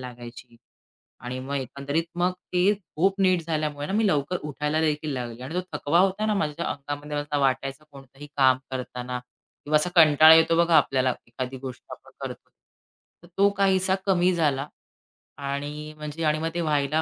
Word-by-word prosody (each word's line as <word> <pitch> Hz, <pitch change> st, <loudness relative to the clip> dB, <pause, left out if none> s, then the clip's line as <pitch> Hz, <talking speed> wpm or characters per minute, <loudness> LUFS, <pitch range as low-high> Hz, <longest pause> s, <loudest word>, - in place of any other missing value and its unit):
लागायची. 120 Hz, -1 st, -10 dB, 0.6 s
आणि 125 Hz, +1 st, -5 dB
मग 140 Hz, +2 st, -5 dB
एकंदरीत 140 Hz, +4 st, -2 dB
मग 180 Hz, +1 st, +2 dB, 0.2 s
ते 185 Hz, +4 st, +4 dB, 0.2 s
खूप 195 Hz, +5 st, +1 dB
नीट 185 Hz, -2 st, +3 dB
झाल्यामुळे 150 Hz, -1 st, -2 dB
मी 215 Hz, 0 st, +2 dB
लवकर 155 Hz, +1 st, 0 dB
उठायला 150 Hz, +1 st, -2 dB
देखील 150 Hz, -1 st, -1 dB
लागली. 120 Hz, -2 st, -5 dB
आणि 135 Hz, +6 st, -7 dB
तो 180 Hz, -, +1 dB, 0.2 s
थकवा 165 Hz, +5 st, +2 dB
होता 195 Hz, +3 st, +2 dB
ना 215 Hz, -, +1 dB
माझ्या 155 Hz, -7 st, -2 dB
अंगामध्ये 145 Hz, +1 st, -5 dB
असा 145 Hz, 0 st, -2 dB
वाटायचं 135 Hz, +2 st, 0 dB
कोणतंही 135 Hz, +1 st, -13 dB
काम 130 Hz, -1 st, +5 dB
करतांना 125 Hz, -1 st, -5 dB, 0.5 s
किंवा 150 Hz, -, +1 dB
असा 180 Hz, +4 st, 0 dB
कंटाळा 155 Hz, -1 st, +8 dB
येतो 165 Hz, +1 st, +4 dB
बघा 170 Hz, -1 st, +4 dB
आपल्याला 130 Hz, -3 st, +2 dB
एखादी 130 Hz, +2 st, -5 dB
गोष्ट 130 Hz, -2 st, -8 dB
आपण -, -, -12 dB
करतो. -, -, -7 dB, 0.7 s
तर -, -, -15 dB
तो 200 Hz, +1 st, +5 dB
काहीसा 190 Hz, -1 st, +3 dB
कमी 185 Hz, -1 st, +3 dB
झाला 145 Hz, -3 st, 0 dB, 0.7 s
आणि 145 Hz, +2 st, -5 dB
म्हणजे 150 Hz, +2 st, -6 dB
आणि 155 Hz, 0 st, +2 dB
मग 165 Hz, +1 st, -1 dB
ते 175 Hz, -, -1 dB
व्हायला 150 Hz, 0 st, +1 dB
150 Hz, 165 wpm, -25 LUFS, 135-170 Hz, 0.7 s, कंटाळा